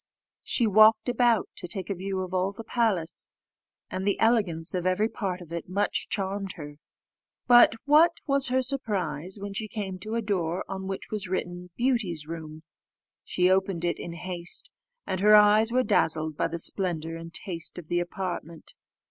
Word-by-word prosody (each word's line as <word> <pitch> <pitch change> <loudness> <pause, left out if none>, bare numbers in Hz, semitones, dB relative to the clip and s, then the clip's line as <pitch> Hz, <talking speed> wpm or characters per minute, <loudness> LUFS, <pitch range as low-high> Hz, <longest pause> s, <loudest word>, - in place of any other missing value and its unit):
She 240 - +1
walked 215 +2 +5
about 240 -3 +2
to - - -4
take 190 +1 -4
a - - +1
view 190 +1 -3
of 185 0 -6
all 185 +1 +1
the 225 - -8
palace, 215 -9 -1 0.6
and 185 0 -3
the 200 0 0
elegance 200 -8 +1
of 180 -1 -1
every 185 +4 +2
part 190 -5 -4
of 170 -2 -12
it 170 0 -5
much 200 +2 -1
charmed 195 -1 -3
her. 145 -3 -9 0.7
But 240 -2 +7
what 310 +4 +6
was 275 -2 +2
her 260 +1 +1
surprise, 190 - -2
when 200 0 -6
she 215 +2 -3
came 195 -3 -5
to 215 +4 -3
a 230 - 0
door 180 -4 -1
on 190 0 -5
which 195 0 -6
was 210 -3 -3
written, 180 -1 -4
BEAUTY'S 230 - 0
ROOM! 155 -1 -8 0.6
She 180 0 +1
opened 190 -2 +1
it 170 - -1
in 170 - -6
haste, 175 0 -5 0.3
and 185 - -2
her 210 +2 +6
eyes 210 +2 +6
were 255 +1 +2
dazzled 160 -6 +1
by - - 0
the - - -4
splendour 165 -2 -1
and 165 0 -8
taste 165 -2 -3
of 175 -3 -8
the 175 - 0
apartment. 175 -2 -5
190 Hz, 180 wpm, -27 LUFS, 175-215 Hz, 0.7 s, But